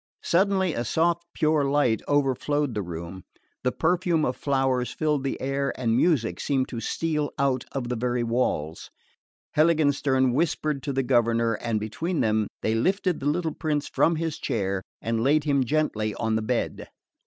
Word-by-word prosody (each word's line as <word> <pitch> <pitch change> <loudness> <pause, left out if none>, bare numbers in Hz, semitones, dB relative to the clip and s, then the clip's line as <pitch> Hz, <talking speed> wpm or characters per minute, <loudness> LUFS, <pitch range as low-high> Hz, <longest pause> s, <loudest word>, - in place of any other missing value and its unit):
Suddenly 190 -1 +2
a 120 - -2
soft 170 +7 0
pure 155 -2 +2
light 140 -5 +2
overflowed 145 0 +1
the 105 - -2
room, 85 +1 -7 0.4
the 125 - +2
perfume 170 0 +1
of 125 - -1
flowers 135 -3 0
filled 150 -3 -1
the 135 - -2
air, 135 0 -2
and 115 -3 +1
music 120 - +2
seemed 135 -2 0
to 120 - -5
steal 150 +5 -1
out 135 -3 +1
of 135 -3 -3
the 125 - -1
very 120 +1 -1
walls. 115 -10 -1 0.7
Heiligenstern 145 -5 +3
whispered 150 -1 0
to 145 - -3
the 135 0 0
governor 115 -2 +2
and 115 0 -2
between 160 - -2
them 110 -1 +1 0.2
they 110 - +1
lifted 180 - +1
the 140 - -3
little 160 0 -1
prince 150 -2 -2
from 165 - +2
his 160 -1 -3
chair 100 -7 -1 0.2
and 115 0 0
laid 150 +3 +3
him 140 -2 +2
gently 115 -7 0
on 110 -1 -1
the 110 - +1
bed. 115 +2 -2
135 Hz, 165 wpm, -25 LUFS, 115-155 Hz, 0.7 s, Heiligenstern